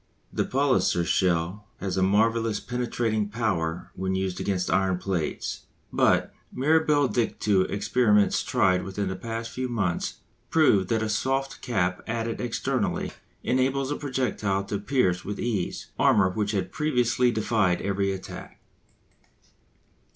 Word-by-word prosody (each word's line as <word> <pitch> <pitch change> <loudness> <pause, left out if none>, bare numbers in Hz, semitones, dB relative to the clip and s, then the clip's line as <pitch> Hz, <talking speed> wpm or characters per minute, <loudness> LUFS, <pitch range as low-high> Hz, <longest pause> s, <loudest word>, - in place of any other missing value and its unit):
The - - 0
Palliser 130 -10 +2
shell 90 +3 0
has 95 -2 -3
a 95 - +1
marvellous 110 +2 +2
penetrating 115 -3 -1
power 90 -7 -2
when 95 0 -2
used 95 -1 -2
against 95 -2 -1
iron 95 -1 +2
plates. 90 -4 -3 0.3
But, - - +3 0.2
mirabile 150 +1 +3
dictu! 105 -5 +1
experiments 105 0 +2
tried 90 -1 +2
within 95 0 -3
the 95 - -3
past 115 +3 -5
few 130 0 -3
months 100 -8 -1 0.3
prove 105 - +4
that 110 +1 +1
a - - -1
soft 135 +5 -1
cap 90 -7 0
added 115 0 -2
externally 120 -2 -1 0.3
enables 135 +2 +1
a - - 0
projectile 125 -9 -1
to 100 0 -3
pierce 100 -6 +1
with 105 +1 -5
ease 105 -7 -2
armour 95 -1 +4
which 105 +1 -1
had 100 -3 -1
previously 125 -4 +2
defied 110 -5 +1
every 100 0 0
attack. 95 -1 -8
105 Hz, 130 wpm, -26 LUFS, 95-125 Hz, 0.3 s, prove